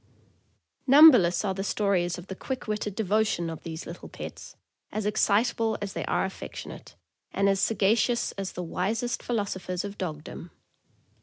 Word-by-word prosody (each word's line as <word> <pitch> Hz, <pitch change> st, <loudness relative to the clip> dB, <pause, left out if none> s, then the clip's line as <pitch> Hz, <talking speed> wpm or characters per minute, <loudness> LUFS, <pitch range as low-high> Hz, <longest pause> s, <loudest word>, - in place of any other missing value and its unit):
Numberless 250 Hz, -, +7 dB
are 190 Hz, -, 0 dB
the 195 Hz, +1 st, -4 dB
stories 190 Hz, -4 st, 0 dB
of 175 Hz, -, -9 dB
the 190 Hz, -, -6 dB
quick 260 Hz, +4 st, -5 dB
witted 210 Hz, -2 st, -3 dB
devotion 205 Hz, -5 st, 0 dB
of 160 Hz, -, -8 dB
these 160 Hz, 0 st, -7 dB
little 170 Hz, -, -9 dB
pets, -, -, -9 dB, 0.4 s
as 215 Hz, -1 st, -3 dB
excitable 220 Hz, +1 st, +2 dB
as 200 Hz, -2 st, -5 dB
they -, -, -3 dB
are -, -, +1 dB
affectionate, 190 Hz, -, -8 dB, 0.4 s
and 195 Hz, -, +1 dB
as 195 Hz, -1 st, +2 dB
sagacious 225 Hz, +4 st, +2 dB
as 195 Hz, -1 st, -5 dB
the 180 Hz, -, -5 dB
wisest 225 Hz, +8 st, -2 dB
philosophers 190 Hz, -5 st, -3 dB
of 200 Hz, 0 st, -8 dB
dogdom. 160 Hz, 0 st, -6 dB
200 Hz, 150 wpm, -27 LUFS, 180-220 Hz, 0.4 s, Numberless